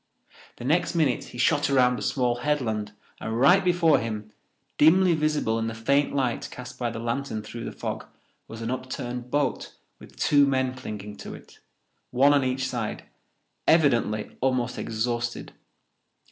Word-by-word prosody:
The 120 Hz, -, -9 dB
next 170 Hz, +5 st, +1 dB
minute 150 Hz, -7 st, +1 dB
he -, -, -11 dB
shot 145 Hz, +5 st, +2 dB
around 125 Hz, -2 st, +3 dB
a -, -, -8 dB
small 125 Hz, -3 st, 0 dB
headland 115 Hz, -7 st, -1 dB, 0.3 s
and 110 Hz, +1 st, -3 dB
right 180 Hz, +9 st, +6 dB
before 175 Hz, -3 st, +4 dB
him, 110 Hz, -2 st, -5 dB, 0.5 s
dimly 175 Hz, +4 st, +6 dB
visible 150 Hz, -8 st, 0 dB
in 115 Hz, -, -1 dB
the 115 Hz, -, -4 dB
faint 140 Hz, +6 st, +1 dB
light 130 Hz, -4 st, -1 dB
cast 125 Hz, 0 st, -10 dB
by 120 Hz, -1 st, 0 dB
the 115 Hz, -, -6 dB
lantern 115 Hz, -1 st, -3 dB
through 115 Hz, +2 st, -7 dB
the -, -, -4 dB
fog, -, -, -5 dB, 0.4 s
was 115 Hz, 0 st, -8 dB
an 115 Hz, -, -2 dB
upturned 125 Hz, -1 st, -5 dB
boat 145 Hz, 0 st, -1 dB, 0.2 s
with -, -, -15 dB
two 145 Hz, -1 st, +4 dB
men 130 Hz, -1 st, +1 dB
clinging 105 Hz, -5 st, -7 dB
to -, -, -8 dB
it, -, -, -16 dB, 0.5 s
one 135 Hz, +3 st, +4 dB
on 140 Hz, -2 st, +3 dB
each 130 Hz, 0 st, -1 dB
side, -, -, -4 dB, 0.6 s
evidently 120 Hz, -9 st, +2 dB
almost 130 Hz, -2 st, 0 dB
exhausted. 120 Hz, +1 st, -3 dB
125 Hz, 160 wpm, -26 LUFS, 115-145 Hz, 0.6 s, right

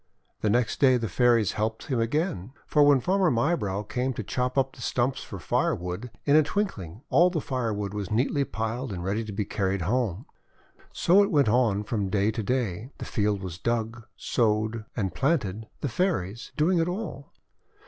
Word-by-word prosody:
The 105 Hz, -, 0 dB
next 120 Hz, +2 st, +1 dB
day 130 Hz, -3 st, +5 dB
the 115 Hz, -2 st, -2 dB
Fairies 115 Hz, +1 st, +3 dB
helped 110 Hz, +1 st, -2 dB
him 130 Hz, -5 st, -1 dB
again. 125 Hz, -, -1 dB
For 150 Hz, -, +2 dB
when 145 Hz, -2 st, +6 dB
Farmer 190 Hz, +2 st, +2 dB
Mybrow 115 Hz, -, 0 dB
came 125 Hz, +5 st, -2 dB
to 110 Hz, -, -5 dB
chop 125 Hz, +5 st, -2 dB
up 135 Hz, 0 st, +1 dB
the -, -, -13 dB
stumps 125 Hz, +2 st, 0 dB
for 100 Hz, -, -8 dB
firewood, 90 Hz, +5 st, -1 dB, 0.2 s
in 145 Hz, -, +4 dB
a 155 Hz, -, +8 dB
twinkling 130 Hz, -, -3 dB
all 175 Hz, +2 st, +6 dB
the 175 Hz, -3 st, -1 dB
fire 130 Hz, -5 st, -2 dB
wood 100 Hz, -1 st, -3 dB
was 105 Hz, -3 st, -4 dB
neatly 130 Hz, +6 st, +1 dB
piled 115 Hz, +3 st, -3 dB
and 90 Hz, -3 st, -5 dB
ready 100 Hz, +5 st, -1 dB
to 110 Hz, -, -7 dB
be 100 Hz, +1 st, -2 dB
carried 95 Hz, -3 st, -1 dB
home. 110 Hz, -, -1 dB, 0.7 s
So 190 Hz, +4 st, +4 dB
it 200 Hz, -, +2 dB
went 145 Hz, -, +3 dB
on 110 Hz, -3 st, +2 dB
from 105 Hz, -3 st, -2 dB
day 100 Hz, +2 st, +2 dB
to 110 Hz, -, -3 dB
day. 115 Hz, -2 st, -2 dB
The -, -, -6 dB
field 105 Hz, -3 st, 0 dB
was 90 Hz, -2 st, -6 dB
dug, 115 Hz, 0 st, -2 dB
sowed, 110 Hz, -1 st, 0 dB
and 95 Hz, -6 st, -2 dB
planted, 115 Hz, -, 0 dB
the -, -, -1 dB
Fairies 120 Hz, -, -1 dB
doing 170 Hz, +4 st, +3 dB
it 165 Hz, -, +1 dB
all. 180 Hz, -7 st, -5 dB
115 Hz, 190 wpm, -27 LUFS, 105-135 Hz, 0.7 s, a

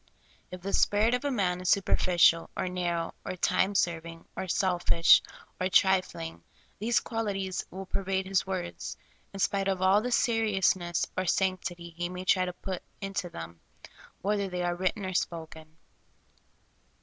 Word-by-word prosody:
If 180 Hz, 0 st, -8 dB
the 195 Hz, +2 st, -4 dB
spirit 215 Hz, +3 st, +3 dB
of 250 Hz, -, 0 dB
a -, -, +2 dB
man 185 Hz, -8 st, 0 dB
is 185 Hz, -, -1 dB
superficial, 175 Hz, -3 st, +4 dB
or 185 Hz, -, -1 dB
narrow, 175 Hz, -2 st, -2 dB
or -, -, -4 dB
time 190 Hz, +2 st, +1 dB
serving, 165 Hz, -2 st, -1 dB
or 190 Hz, -, -4 dB
selfish, 175 Hz, -2 st, +4 dB, 0.4 s
or 185 Hz, 0 st, 0 dB
trifling, 185 Hz, -3 st, +1 dB, 0.4 s
these 230 Hz, +3 st, +2 dB
qualities 195 Hz, -5 st, -3 dB
will 190 Hz, +1 st, -7 dB
per 195 Hz, -, -3 dB
vade 190 Hz, 0 st, -1 dB
his 190 Hz, -1 st, 0 dB
words, 180 Hz, -2 st, -4 dB, 0.3 s
in 195 Hz, -, -8 dB
spite 195 Hz, 0 st, +1 dB
of 190 Hz, -1 st, 0 dB
all 190 Hz, +3 st, +4 dB
the 250 Hz, +2 st, -3 dB
seriousness 195 Hz, -7 st, +2 dB
or 185 Hz, 0 st, -1 dB
sanc 185 Hz, 0 st, +1 dB
tity 170 Hz, -2 st, -7 dB
he 175 Hz, +1 st, -3 dB
may 180 Hz, 0 st, -6 dB
try 185 Hz, -1 st, +3 dB
to 180 Hz, -, -4 dB
put 185 Hz, 0 st, -5 dB, 0.2 s
into 195 Hz, -2 st, -3 dB
them, 85 Hz, -, -9 dB, 0.6 s
whether 200 Hz, 0 st, 0 dB
they 180 Hz, -1 st, -3 dB
are 175 Hz, 0 st, 0 dB
written 190 Hz, +3 st, -1 dB
or 185 Hz, -, -3 dB
spoken. 160 Hz, -2 st, -4 dB
185 Hz, 160 wpm, -29 LUFS, 175-195 Hz, 0.6 s, superficial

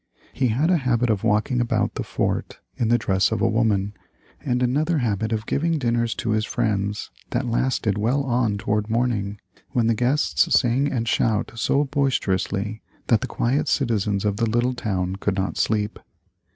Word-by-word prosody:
He 130 Hz, -, +1 dB
had 140 Hz, +10 st, +1 dB
a 180 Hz, -, +4 dB
habit 125 Hz, -4 st, +1 dB
of 100 Hz, -3 st, -1 dB
walking 110 Hz, +4 st, +1 dB
about 120 Hz, -, 0 dB
the -, -, -4 dB
fort -, -, -2 dB, 0.2 s
in 115 Hz, -, 0 dB
the 120 Hz, +1 st, +4 dB
dress 95 Hz, -3 st, +1 dB
of 110 Hz, -, 0 dB
a 115 Hz, -, +2 dB
woman, 105 Hz, -3 st, +1 dB, 0.5 s
and 125 Hz, 0 st, 0 dB
another 150 Hz, +7 st, +1 dB
habit 110 Hz, -4 st, -1 dB
of 110 Hz, 0 st, -1 dB
giving 165 Hz, +6 st, 0 dB
dinners 120 Hz, -3 st, 0 dB
to 115 Hz, -, -2 dB
his 110 Hz, 0 st, +1 dB
friends 105 Hz, -3 st, -2 dB, 0.2 s
that 130 Hz, -, -1 dB
lasted 115 Hz, -3 st, 0 dB
well 125 Hz, +7 st, +1 dB
on 120 Hz, -5 st, 0 dB
toward 105 Hz, +1 st, -1 dB
morning, 110 Hz, -4 st, -1 dB, 0.3 s
when 120 Hz, -4 st, +2 dB
the 115 Hz, -, +3 dB
guests 125 Hz, +6 st, +1 dB
sang 130 Hz, +4 st, +1 dB
and 115 Hz, -3 st, -2 dB
shouted 115 Hz, +1 st, 0 dB
so 140 Hz, +5 st, +2 dB
boisterously 110 Hz, -7 st, -1 dB, 0.3 s
that 115 Hz, -4 st, +4 dB
the -, -, -2 dB
quiet 130 Hz, +5 st, 0 dB
citizens 105 Hz, -6 st, 0 dB
of 100 Hz, -1 st, 0 dB
the 115 Hz, -1 st, +1 dB
little 120 Hz, +3 st, +1 dB
town 95 Hz, -6 st, -2 dB
could 100 Hz, 0 st, -1 dB
not 95 Hz, 0 st, -2 dB
sleep. 105 Hz, -1 st, 0 dB
115 Hz, 180 wpm, -23 LUFS, 105-125 Hz, 0.5 s, a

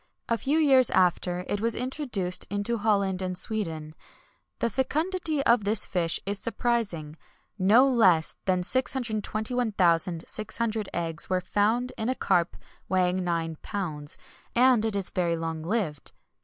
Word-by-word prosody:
A 230 Hz, -, +2 dB
few 270 Hz, +7 st, 0 dB
years 270 Hz, -6 st, +5 dB
after, 180 Hz, 0 st, +1 dB
it 205 Hz, -, -2 dB
was 230 Hz, 0 st, +1 dB
introduced 245 Hz, -8 st, -2 dB
into 205 Hz, +3 st, -1 dB
Holland 200 Hz, -3 st, +1 dB
and 185 Hz, -1 st, -3 dB
Sweden. 165 Hz, -8 st, -3 dB, 0.6 s
The -, -, 0 dB
fecundity 310 Hz, -, -1 dB
of 235 Hz, -4 st, +3 dB
this 210 Hz, +1 st, +1 dB
fish 170 Hz, -3 st, 0 dB
is 200 Hz, 0 st, -1 dB
surprising; 205 Hz, -11 st, -2 dB, 0.4 s
no 220 Hz, +8 st, +5 dB
less 190 Hz, -, +3 dB
than 185 Hz, -1 st, +1 dB
621,600 215 Hz, -3 st, 0 dB
eggs 165 Hz, -2 st, -2 dB
were 185 Hz, -1 st, +1 dB
found 215 Hz, +7 st, 0 dB
in 220 Hz, +2 st, -1 dB
a 260 Hz, -, 0 dB
carp 175 Hz, -7 st, 0 dB, 0.3 s
weighing 185 Hz, 0 st, +1 dB
nine 165 Hz, -2 st, -2 dB
pounds; 155 Hz, -7 st, -5 dB, 0.4 s
and 250 Hz, -2 st, +4 dB
it 220 Hz, -2 st, -1 dB
is 195 Hz, -2 st, -2 dB
very 170 Hz, -2 st, 0 dB
long 165 Hz, -1 st, -4 dB
lived. 165 Hz, -5 st, -3 dB
205 Hz, 135 wpm, -27 LUFS, 180-235 Hz, 0.6 s, years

